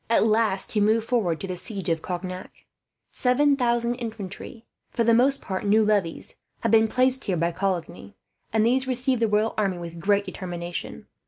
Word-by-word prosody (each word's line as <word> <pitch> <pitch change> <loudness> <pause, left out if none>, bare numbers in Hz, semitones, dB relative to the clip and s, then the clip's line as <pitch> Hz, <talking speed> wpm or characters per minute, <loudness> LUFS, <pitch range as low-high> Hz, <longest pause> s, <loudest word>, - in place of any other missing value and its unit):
At 230 - +4
last 215 -3 +1
he 210 - +1
moved 220 +2 +2
forward 195 -10 0
to 195 - -4
the 185 - -4
siege 195 0 -5
of 165 -2 0
Cognac. 185 +1 -6 0.5
Seven 280 +3 +2
thousand 240 -2 +1
infantry, 225 -1 -7 0.2
for 235 - 0
the 230 0 +4
most 265 +4 +3
part 190 -1 -4
new 215 +1 +3
levies, 200 -6 -1 0.2
had 230 - 0
been 225 0 +5
placed 255 +3 +1
here 185 -3 0
by 170 +1 0
Coligny; 170 - -4 0.4
and 220 0 +2
these 260 +3 +2
received 255 -1 0
the 225 - +3
royal 215 +1 +1
army 195 -4 0
with 170 -1 -8
great 200 +3 +2
determination. 175 -2 -6
215 Hz, 180 wpm, -25 LUFS, 185-235 Hz, 0.5 s, been